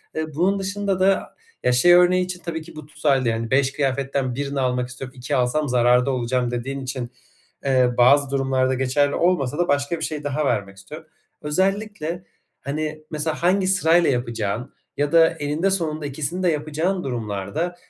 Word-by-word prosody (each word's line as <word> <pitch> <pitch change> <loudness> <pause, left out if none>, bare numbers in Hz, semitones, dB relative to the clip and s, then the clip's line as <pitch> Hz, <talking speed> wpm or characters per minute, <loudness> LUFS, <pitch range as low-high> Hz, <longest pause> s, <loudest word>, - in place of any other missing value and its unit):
Eee, 155 -1 -3
bunun 190 +5 +1
dışında 195 0 -2
da, 195 +1 +1 0.3
ya, 125 - +3
şey 150 +8 +5
örneği 180 +1 +5
için 180 -1 -6
tabii 165 -1 -3
ki 160 +1 -13
bu 155 -1 -9
tutarlı 140 -4 +1
yani 115 0 -3
5 135 0 +3
kıyafetten 135 -2 -1
1'ini 140 +1 -3
almak 125 -1 0
istiyorum, 130 +1 -9
2 130 +4 -2
alsam 135 +4 +1
zararda 125 +2 +3
olacağım 125 -1 -1
dediğin 135 +3 -4
için, 130 -2 -5 0.5
ııı, 130 -2 +2
bazı 140 +3 +5
durumlarda 135 -1 +1
geçerli 135 +2 +1
olmasa 150 -6 +1
da 175 0 +1
başka 145 +3 0
bir - - -4
şey 150 -2 -5
daha 145 +1 -1
vermek 100 -6 -1
istiyorum. 155 +12 -11 0.3
Özellikle, 190 +1 -1 0.4
hani, 155 +2 -4
mesela, 155 +2 -3
hangi 185 +1 +3
sırayla 175 -3 +4
yapacağın 120 -2 -2 0.2
ya 145 0 0
da 165 -1 +6
eninde 155 +3 -1
sonunda 155 -5 -1
ikisini 155 +6 -3
de 175 - +3
yapacağın 155 +5 -1
durumlarda, 115 - -3
145 Hz, 170 wpm, -22 LUFS, 130-165 Hz, 0.5 s, da